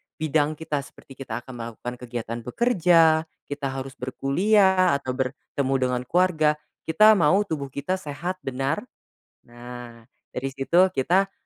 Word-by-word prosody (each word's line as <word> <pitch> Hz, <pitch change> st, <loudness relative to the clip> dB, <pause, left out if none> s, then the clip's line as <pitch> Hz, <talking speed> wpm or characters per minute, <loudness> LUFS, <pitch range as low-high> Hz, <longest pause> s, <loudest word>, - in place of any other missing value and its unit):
bidang 155 Hz, 0 st, 0 dB
kita, 150 Hz, -2 st, -3 dB
seperti 135 Hz, -, -13 dB
kita 120 Hz, -3 st, -5 dB
akan 125 Hz, -2 st, -10 dB
melakukan 120 Hz, +2 st, -7 dB
kegiatan 120 Hz, -1 st, -5 dB
bekerja, 165 Hz, -, +3 dB, 0.2 s
kita 145 Hz, -1 st, -4 dB
harus 135 Hz, +1 st, -6 dB
berkuliah, 185 Hz, +7 st, +3 dB
atau 140 Hz, -2 st, -3 dB
bertemu 130 Hz, +1 st, -3 dB
dengan 125 Hz, -1 st, 0 dB
keluarga, 160 Hz, -4 st, +2 dB, 0.3 s
kita 215 Hz, +7 st, +6 dB
mau 180 Hz, +6 st, +4 dB
tubuh 150 Hz, -7 st, -4 dB
kita 145 Hz, +8 st, -3 dB
sehat 175 Hz, +4 st, -5 dB
benar, 135 Hz, +3 st, -2 dB, 0.7 s
nah 120 Hz, -1 st, -10 dB, 0.3 s
dari 135 Hz, +2 st, -2 dB
situ 170 Hz, +8 st, +3 dB
kita 185 Hz, +6 st, +1 dB
140 Hz, 130 wpm, -24 LUFS, 130-175 Hz, 0.7 s, kita